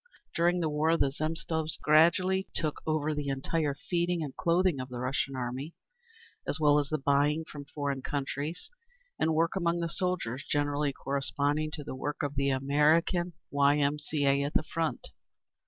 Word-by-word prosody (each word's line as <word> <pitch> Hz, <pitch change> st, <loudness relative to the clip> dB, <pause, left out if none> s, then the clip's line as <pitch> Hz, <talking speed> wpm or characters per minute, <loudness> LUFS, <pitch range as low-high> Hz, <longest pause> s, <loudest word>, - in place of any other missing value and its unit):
During 175 Hz, +1 st, +2 dB
the 165 Hz, -, +1 dB
war 155 Hz, +2 st, +2 dB
the 140 Hz, -3 st, +2 dB
Zemstvos 160 Hz, +1 st, -2 dB
gradually 185 Hz, +5 st, +4 dB
took 155 Hz, -2 st, -1 dB
over 155 Hz, -1 st, +1 dB
the 145 Hz, -1 st, -3 dB
entire 140 Hz, +2 st, -1 dB
feeding 175 Hz, +2 st, -1 dB
and 140 Hz, -3 st, -6 dB
clothing 175 Hz, -3 st, +2 dB
of 130 Hz, 0 st, -5 dB
the 125 Hz, -, -6 dB
Russian 130 Hz, +2 st, -1 dB
Army, 130 Hz, +5 st, -4 dB, 0.7 s
as 150 Hz, -, -1 dB
well 150 Hz, -1 st, +5 dB
as 145 Hz, -1 st, -2 dB
the 155 Hz, -, 0 dB
buying 145 Hz, +3 st, +2 dB
from 145 Hz, -2 st, -9 dB
foreign 140 Hz, -2 st, -3 dB
countries, 145 Hz, -, -4 dB, 0.5 s
and 160 Hz, 0 st, +2 dB
work 165 Hz, +3 st, +2 dB
among 170 Hz, -2 st, +1 dB
the 170 Hz, -, -1 dB
soldiers 165 Hz, -8 st, -2 dB
generally 145 Hz, 0 st, +1 dB
corresponding 140 Hz, +3 st, -1 dB
to 150 Hz, -, -5 dB
the -, -, -6 dB
work 145 Hz, +3 st, -4 dB
of 145 Hz, -1 st, -2 dB
the 140 Hz, 0 st, +1 dB
American 150 Hz, +6 st, +2 dB, 0.2 s
Y. 140 Hz, +1 st, +4 dB
M. 145 Hz, +1 st, +1 dB
C. 150 Hz, -1 st, -2 dB
A. 140 Hz, 0 st, +3 dB
at 145 Hz, +1 st, -3 dB
the -, -, +3 dB
Front. 165 Hz, 0 st, -3 dB
150 Hz, 170 wpm, -30 LUFS, 140-165 Hz, 0.7 s, well